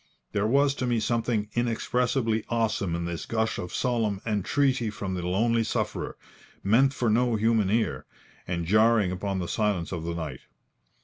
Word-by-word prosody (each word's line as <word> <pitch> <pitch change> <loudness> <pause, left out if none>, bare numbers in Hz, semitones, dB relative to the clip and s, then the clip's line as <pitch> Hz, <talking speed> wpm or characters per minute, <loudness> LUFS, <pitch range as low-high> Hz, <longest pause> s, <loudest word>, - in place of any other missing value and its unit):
There 105 +1 +1
was 140 +3 +3
to 125 - 0
me 120 -2 +1
something 115 -1 0
inexpressibly 120 -1 0
awesome 110 -6 0
in 85 0 -3
this 85 -1 -4
gush 110 -1 -1
of 90 - -5
solemn 115 -5 0
entreaty 115 +4 +1
from 100 -2 -4
the 90 - -2
lonely 115 +6 +1
sufferer, - - -3 0.5
meant 125 +7 +4
for 125 -3 -1
no 120 +1 +2
human 110 -2 +2
ear, 110 +2 0 0.4
and 85 -2 -2
jarring 110 0 +4
upon 95 +1 -2
the 90 -2 -3
silence 105 -6 -1
of 85 -4 -4
the 85 0 -3
night. 75 -6 -5
110 Hz, 165 wpm, -27 LUFS, 95-120 Hz, 0.5 s, meant